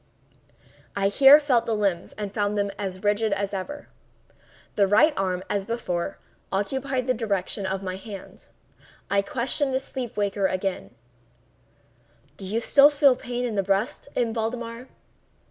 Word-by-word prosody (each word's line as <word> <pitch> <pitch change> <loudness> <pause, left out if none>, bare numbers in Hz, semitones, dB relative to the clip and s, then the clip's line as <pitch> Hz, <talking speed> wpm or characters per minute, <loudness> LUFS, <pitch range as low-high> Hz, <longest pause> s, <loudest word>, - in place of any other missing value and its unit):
I 200 0 +2
here 275 +7 +8
felt 265 -6 +1
the 225 - +1
limbs 195 -5 -1
and 205 -2 -6
found 205 0 0
them 200 0 0
as 190 -1 -5
rigid 210 +1 +1
as 200 0 -2
ever. 200 +10 -5 0.9
The 200 -1 +3
right 305 +11 +5
arm, 185 -1 -1
as 200 -1 -1
before, 185 -6 -3 0.3
obeyed 260 +6 -1
the 255 - +2
direction 200 -4 -2
of 190 +1 -3
my 185 -1 -4
hand. 200 -1 -10 0.6
I 200 0 +4
questioned 260 +5 -1
the - - +2
sleep 255 -4 -6
waker 200 -1 +1
again: 185 - -3 1.4
"Do 195 - -8
you 220 +4 0
still 280 +4 +7
feel 285 -3 +4
pain 245 -1 -4
in 235 - -2
the 200 - +1
breast, 195 +10 -1
M. 235 -2 0
Valdemar?" 230 +2 -4
210 Hz, 150 wpm, -25 LUFS, 195-250 Hz, 1.4 s, here